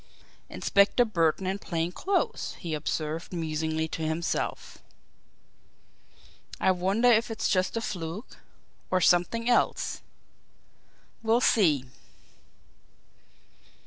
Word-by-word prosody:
"Inspector 200 +5 +3
Burton 175 -3 +1
in 190 +2 -2
plain 170 -2 -2
clothes," 380 - -1
he 170 -3 -5
observed 155 +1 -3
musingly 160 -1 -2
to 160 - -5
himself. 160 +2 -3 1.8
"I 190 - +3
wonder 190 +6 +1
if 230 -1 +4
it's 225 - -2
just 185 +3 +1
a - - -1
fluke 180 +2 -6 0.5
or 185 - +2
something 180 +7 +2
else? 245 - +1 1.2
We'll 225 +1 +3
see." 160 - +3
180 Hz, 95 wpm, -27 LUFS, 160-220 Hz, 1.8 s, if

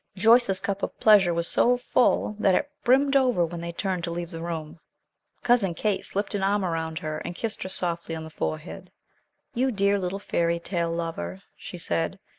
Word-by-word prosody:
Joyce's 220 -1 +5
cup 200 +1 -3
of - - -4
pleasure 205 -5 +6
was 170 0 -1
so 245 +1 +3
full, 245 -3 +1
that 195 -3 +3
it 290 0 -1
brimmed 275 +3 +3
over 250 -10 +3
when 170 0 -7
they 170 0 -5
turned 185 0 -3
to - - -4
leave 170 +1 -5
the 165 -1 -6
room. 165 -2 -5 0.6
Cousin 215 -8 +2
Kate 210 0 -1
slipped 200 +2 -2
an 205 - -1
arm 200 0 +1
around 160 -2 -3
her, 155 -2 -4
and 175 - -6
kissed 220 +1 -4
her 185 - -4
softly 170 -3 -1
on 160 - -6
the 160 - -10
forehead. 155 +2 -5 0.6
"You 260 +1 +1
dear 200 -3 +1
little 185 +1 -3
fairy 170 -4 -1
tale 170 -1 -2
lover," 160 - -4
she - - -9
said. - - -2
185 Hz, 195 wpm, -25 LUFS, 170-210 Hz, 0.6 s, pleasure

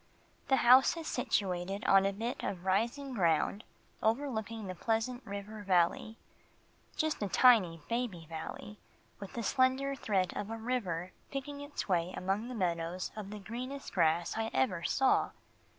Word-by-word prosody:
The 270 - +4
house 260 +6 +7
is 330 - -5
situated 195 - -1
on 195 -2 +5
a - - +1
bit 225 +5 -4
of 180 -1 -4
rising 235 +8 0
ground 175 0 +1 0.4
overlooking 225 -2 -1
the 185 - -4
Pleasant 225 +6 -1
River 200 +2 -6
Valley 190 +3 +1 0.8
just 315 -5 0
a 205 - 0
tiny, 190 -11 +5
baby 230 -8 -2
valley 165 +6 -7 0.4
with 200 +3 -9
a 235 - -2
slender 260 +4 +2
thread 195 -8 0
of 205 - -4
a 225 - -4
river 195 -7 -2 0.2
picking 285 +1 -5
its 285 0 -5
way 180 -1 0
among 210 +6 -2
meadows 175 -1 -1
of 210 -2 -6
the 210 - -6
greenest 250 +7 -6
grass 170 -1 +2
I 225 0 -1
ever 150 +7 +1
saw. 270 -1 +2
210 Hz, 150 wpm, -32 LUFS, 185-250 Hz, 0.8 s, house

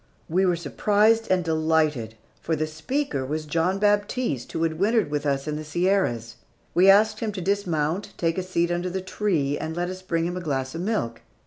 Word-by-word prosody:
We 185 +3 +2
were 180 - +3
surprised 210 +6 +2
and 185 -1 +2
delighted, 155 -8 +1 0.3
for 160 - -1
the 155 0 -1
speaker 155 - -2
was 155 +4 -3
John 165 +5 0
Baptiste 205 - 0
who 165 - -1
had 160 -1 -1
wintered 210 -4 +2
with 150 0 -1
us 140 +1 -1
in 150 0 -2
the 155 - -5
Sierras. 155 - 0 0.4
We 185 +3 +5
asked 215 +2 +5
him 220 -2 -2
to 195 - -5
dismount, 185 0 -1
take 165 +1 0
a - - 0
seat 175 -2 0
under 175 +1 -1
the 190 +1 -3
tree, 175 -7 -1
and 160 0 -4
let 175 +1 -1
us 185 0 -8
bring 165 -3 -1
him 175 +1 -2
a - - -4
glass 135 -5 -2
of 165 - -4
milk. 180 - -2
170 Hz, 205 wpm, -25 LUFS, 155-195 Hz, 0.4 s, We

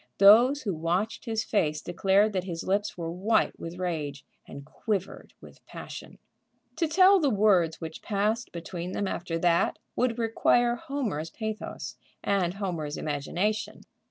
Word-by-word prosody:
Those 240 +9 +7
who 200 -5 -1
watched 175 +9 -1
his 225 -1 -1
face 155 -7 0
declared 195 +4 +2
that 185 -1 -1
his 170 -3 -5
lips 200 +1 -1
were 165 -1 -4
white 205 +6 +1
with 165 +1 -7
rage 155 -6 -3 0.2
and 140 - -9
quivered 195 +4 -4
with - - -15
passion. - - -9 0.6
To 330 - +1
tell 375 +4 +6
the 295 -5 +2
words 195 -7 +3
which 160 -1 -7
passed 215 +3 -1
between 175 +1 -6
them 200 - -1
after 170 -2 -3
that 170 0 +2 0.2
would 245 -2 +1
require 240 +1 +2
Homer's 235 - -3
pathos 215 - -6 0.3
and 190 -3 +1
Homer's 170 -7 -3
imagination. 180 +9 -2
195 Hz, 145 wpm, -27 LUFS, 165-220 Hz, 0.6 s, Those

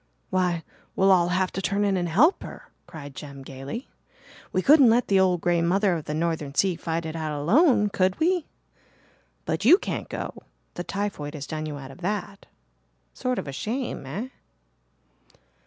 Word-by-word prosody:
"Why, 180 -3 +1 0.3
we'll 195 0 +4
all 175 -2 +5
have 185 +1 0
to 195 - -4
turn 200 +2 0
in 200 -1 +2
and 175 -2 -1
help 285 - +4
her," - - -10 0.2
cried 150 -5 -9
Jem 140 -1 -9
gaily. 135 - -7 0.6
"We 185 - 0
couldn't 280 -4 +7
let 235 +2 +2
the 195 -1 +4
'old 180 -2 +3
grey 175 -1 +2
mother 190 +3 +2
of 160 -3 -4
the 150 - -3
northern 155 -3 -2
sea' 190 -1 +2
fight 165 0 -3
it 160 0 -5
out 155 -2 -3
alone, 215 - +4
could 185 -1 0
we? 350 0 +1 1.0
But 160 +4 -2
you 305 - +8
can't - - -4
go - - -6 0.3
the 175 - -5
typhoid 185 -7 -4
has 145 -1 -5
done 155 +2 -4
you 150 -1 -5
out 135 -1 -9
of 155 - -14
that. 200 +1 -4 0.7
Sort 255 -1 -2
of - - -4
a - - -4
shame, 235 - -3
eh?" 205 - -4
180 Hz, 180 wpm, -25 LUFS, 155-205 Hz, 1.0 s, you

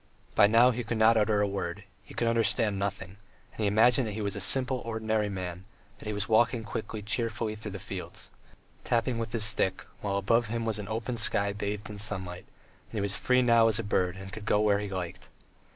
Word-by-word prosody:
By 100 - +6
now 115 +4 +6
he 125 0 -3
could 115 0 -3
not 110 +1 +5
utter 105 -1 +2
a 105 - +2
word, 95 -3 -4 0.2
he - - -14
could 120 - 0
understand 115 -3 +2
nothing, 100 -1 -4 0.3
and - - -19
he 105 - +1
imagined 115 +4 +4
he 105 +1 -4
was 100 -1 -1
a 100 - -3
simple 130 +6 +2
ordinary 110 -2 -1
man, 90 -2 -5 0.4
that - - -9
he 105 - -2
was 105 0 -2
walking 115 +1 +3
quickly, 110 -1 -5
cheerfully 115 0 -1
through 110 0 -7
the 100 - -6
fields, - - -7 0.5
tapping 120 0 0
with 115 -2 -4
his 115 -2 0
stick, 100 -3 0 0.2
while 100 -1 -1
above 115 +4 +2
him 115 +1 -2
was 110 -2 0
the 105 -1 -6
open 115 +3 -3
sky 100 -2 +1
bathed 105 0 -4
in 105 -1 -8
sunshine, 95 -4 -1
and - - -15 0.5
that - - -4
he - - 0
was 100 -1 -1
free 125 0 +2
now 115 -2 +5
as 110 -2 +2
a 115 - -2
bird 90 -3 0
and 95 0 -9
could 110 -1 -7
go 105 - +3
where 105 -1 +3
he 105 -1 -4
liked! 90 -3 -6
105 Hz, 225 wpm, -29 LUFS, 100-115 Hz, 0.5 s, By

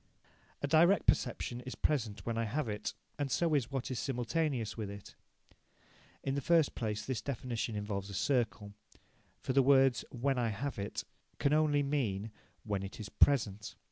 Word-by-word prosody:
A - - +2
direct 170 +6 +5
perception 120 0 +1
is 130 +1 -7
present 110 -9 -1
when 115 - -1
I 115 0 0
have 130 +5 -1
it, 105 -1 -3 0.2
and 145 -1 0
so 165 +4 +1
is 135 -5 +2
what 135 -2 -3
is 125 - -2
simultaneous 130 0 -1
with 110 -3 -4
it. 100 0 -9 1.1
In 135 - -1
the 140 - -1
first 165 +1 +3
place 105 -2 -3
this 130 -3 -2
definition 120 -4 -3
involves 105 -1 -3
a 100 - -6
circle, 110 -6 0 0.7
for 130 - -1
the 135 - +6
words 135 -1 +5
"when 130 +1 0
I 120 -2 +1
have 125 +4 -3
it," 100 - -3 0.3
can 140 0 +2
only 150 -2 +3
mean 115 -8 -1 0.3
"when 100 -3 -2
it 95 +3 -7
is 105 - -6
present". 105 -7 +2
125 Hz, 175 wpm, -33 LUFS, 105-140 Hz, 1.1 s, the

